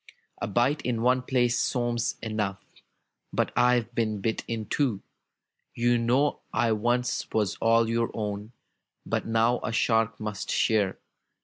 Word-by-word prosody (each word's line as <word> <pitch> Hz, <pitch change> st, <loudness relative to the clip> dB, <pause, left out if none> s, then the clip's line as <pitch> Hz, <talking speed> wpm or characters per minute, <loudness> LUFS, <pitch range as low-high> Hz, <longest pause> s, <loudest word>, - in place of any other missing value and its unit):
A -, -, -1 dB
bite 120 Hz, +8 st, +1 dB
in 115 Hz, -2 st, -1 dB
one 125 Hz, +1 st, +3 dB
place 120 Hz, -2 st, +1 dB
seems 120 Hz, -2 st, 0 dB
enough. 105 Hz, -3 st, -3 dB, 0.7 s
But -, -, 0 dB
I've 125 Hz, -1 st, +3 dB
been 110 Hz, -3 st, -1 dB
bit 110 Hz, +3 st, -1 dB
in 115 Hz, -2 st, -3 dB
two. 120 Hz, -9 st, 0 dB, 0.7 s
"You 120 Hz, 0 st, +2 dB
know 130 Hz, +5 st, +2 dB
I 120 Hz, -3 st, +1 dB
once 120 Hz, +3 st, 0 dB
was 105 Hz, -2 st, 0 dB
all 115 Hz, 0 st, +3 dB
your 115 Hz, 0 st, 0 dB
own. 105 Hz, +1 st, -4 dB, 0.5 s
But -, -, -2 dB
now 115 Hz, +2 st, +2 dB
a -, -, -3 dB
shark 115 Hz, -1 st, +1 dB
must 105 Hz, -2 st, -5 dB
share! 105 Hz, -4 st, +2 dB
115 Hz, 140 wpm, -27 LUFS, 110-120 Hz, 0.7 s, one